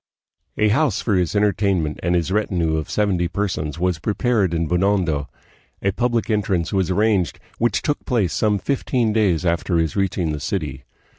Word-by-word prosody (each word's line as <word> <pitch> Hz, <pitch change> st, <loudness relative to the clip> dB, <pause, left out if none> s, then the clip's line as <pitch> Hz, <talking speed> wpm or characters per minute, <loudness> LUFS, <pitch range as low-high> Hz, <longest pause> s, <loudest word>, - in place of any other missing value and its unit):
A 105 Hz, 0 st, +3 dB
house 125 Hz, -2 st, +2 dB
for 110 Hz, -, -1 dB
his 90 Hz, 0 st, +1 dB
entertainment 100 Hz, -6 st, +1 dB
and 90 Hz, 0 st, +1 dB
his 85 Hz, +1 st, 0 dB
retinue 90 Hz, -6 st, 0 dB
of 80 Hz, -, -4 dB
seventy 95 Hz, -5 st, +1 dB
per 100 Hz, +4 st, -1 dB
sons 75 Hz, -4 st, -4 dB
was 90 Hz, -1 st, 0 dB
prepared 105 Hz, 0 st, +1 dB
in 85 Hz, -1 st, -1 dB
Binondo. 90 Hz, -4 st, +1 dB, 0.5 s
A 100 Hz, -, +2 dB
public 120 Hz, +2 st, 0 dB
entrance 100 Hz, -6 st, 0 dB
was 95 Hz, -2 st, +1 dB
arranged, 100 Hz, -2 st, +1 dB, 0.2 s
which 115 Hz, -2 st, +1 dB
took 145 Hz, -, -1 dB
place 110 Hz, -, 0 dB
some 105 Hz, -2 st, +2 dB
fifteen 120 Hz, 0 st, 0 dB
days 95 Hz, -6 st, +2 dB
after 85 Hz, +1 st, +1 dB
his 80 Hz, -1 st, 0 dB
reaching 95 Hz, -4 st, 0 dB
the 75 Hz, -, -3 dB
city. 75 Hz, -3 st, -4 dB
95 Hz, 170 wpm, -21 LUFS, 85-105 Hz, 0.5 s, A